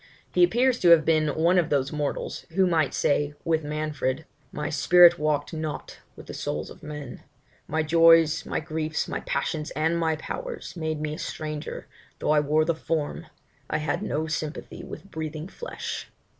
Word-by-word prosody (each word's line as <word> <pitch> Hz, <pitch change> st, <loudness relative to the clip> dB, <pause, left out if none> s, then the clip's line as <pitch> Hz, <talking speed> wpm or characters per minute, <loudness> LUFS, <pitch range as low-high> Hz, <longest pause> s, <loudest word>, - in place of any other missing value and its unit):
He 360 Hz, -, +5 dB
appears 255 Hz, -6 st, +3 dB
to 175 Hz, -, +4 dB
have 165 Hz, -2 st, +7 dB
been 155 Hz, -1 st, +3 dB
one 165 Hz, +5 st, +3 dB
of 170 Hz, -, 0 dB
those 140 Hz, -2 st, +1 dB
mortals, 150 Hz, -2 st, -3 dB
who 190 Hz, 0 st, +5 dB
might 160 Hz, -5 st, +1 dB
say, 145 Hz, 0 st, +1 dB
with 160 Hz, -2 st, +1 dB
Manfred 150 Hz, -1 st, -2 dB, 0.3 s
My 150 Hz, -, -3 dB
spirit 175 Hz, +4 st, +6 dB
walk'd 150 Hz, +1 st, 0 dB
not 155 Hz, -1 st, -5 dB, 0.2 s
with -, -, -12 dB
the -, -, -8 dB
souls -, -, -4 dB
of -, -, -13 dB
men; 150 Hz, -4 st, -7 dB, 0.5 s
My 160 Hz, +1 st, 0 dB
joys, 165 Hz, 0 st, +5 dB
my -, -, -2 dB
griefs, 155 Hz, 0 st, -2 dB
my -, -, -3 dB
passions, 155 Hz, -1 st, -2 dB
and 160 Hz, +2 st, +1 dB
my 160 Hz, -1 st, +1 dB
powers, -, -, -6 dB
Made 160 Hz, -2 st, -2 dB
me 150 Hz, 0 st, -3 dB
a 155 Hz, -, -7 dB
stranger; 155 Hz, -2 st, -5 dB, 0.3 s
though -, -, 0 dB
I 155 Hz, -, +5 dB
wore 150 Hz, +2 st, +2 dB
the 170 Hz, -, +2 dB
form, 160 Hz, 0 st, -3 dB, 0.4 s
I -, -, +1 dB
had 155 Hz, +4 st, -1 dB
no 160 Hz, -6 st, -1 dB
sympathy 155 Hz, 0 st, -5 dB
with 195 Hz, -, -10 dB
breathing 155 Hz, 0 st, -5 dB
flesh! 480 Hz, -, -6 dB
155 Hz, 175 wpm, -26 LUFS, 150-165 Hz, 0.5 s, have